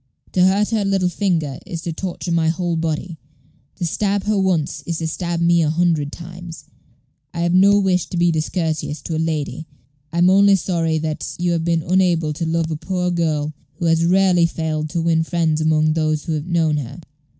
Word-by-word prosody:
To 180 - +3
hurt 200 +4 +2
her 220 -2 +1
little 195 -2 +1
finger 170 -8 -1
is 165 -1 -7
to 170 - -3
torture 180 0 -5
my 165 -1 +2
whole 170 +1 -1
body. 165 +1 -3 0.6
To 180 - -3
stab 200 +4 0
her 215 0 0
once 175 -6 0
is 170 -1 -2
to 165 - -3
stab 170 +1 -3
me 170 0 +3
a 155 - +2
hundred 160 -3 +1
times. 175 0 -10 0.7
I 170 - -2
have 170 0 +1
no 200 +2 +5
wish 185 -3 +1
to 180 - -5
be 175 0 +3
discourteous 160 -1 -2
to 165 - -3
a - - -1
lady; 160 0 -3 0.4
I 170 - -4
am 175 +2 +5
only 200 +1 +6
sorry 165 -3 0
that 155 -1 -4
you 175 0 0
have 165 -1 0
been 165 -1 0
unable 170 -3 +1
to 165 +2 -3
love 165 0 -1
a 155 - -2
poor 180 +2 -2
girl 155 -3 -1 0.2
who 170 - -4
has 165 0 +3
rarely 180 -1 +4
failed 155 -2 -3
to 165 +1 -2
win 165 -1 +2
friends 160 -1 0
among 155 0 +2
those 155 -1 0
who - - -4
have 155 +1 -3
known 165 -3 +1
her. 140 +3 -6
170 Hz, 205 wpm, -20 LUFS, 160-180 Hz, 0.7 s, only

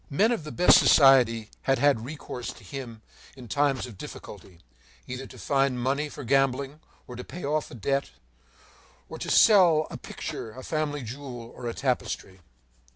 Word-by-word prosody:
Men 200 - +2
of 230 -10 -2
the 150 - -7
best 180 - +6
society 120 -6 +5 0.2
had 135 - +4
had 140 -4 +2
recourse 130 -3 -6
to - - -17
him 115 0 -8 0.3
in 125 -2 -11
times 140 +2 0
of 115 -6 -12
difficulty, 85 -3 -11 0.4
either 125 +1 -6
to - - -14
find 135 -2 0
money 140 +4 -1
for 145 - -9
gambling, 135 +2 0 0.3
or 125 - -10
to 125 - -7
pay 175 -1 -8
off 150 +1 -1
a - - -11
debt, 135 +5 -1 1.0
or - - -8
to - - -5
sell 175 -8 +6
a - - -6
picture, 110 - -7
a 130 - -10
family 150 -2 -2
jewel, 120 -1 -8
or 120 - -7
a 115 - -4
tapestry. 120 -7 -3
135 Hz, 170 wpm, -26 LUFS, 120-145 Hz, 1.0 s, best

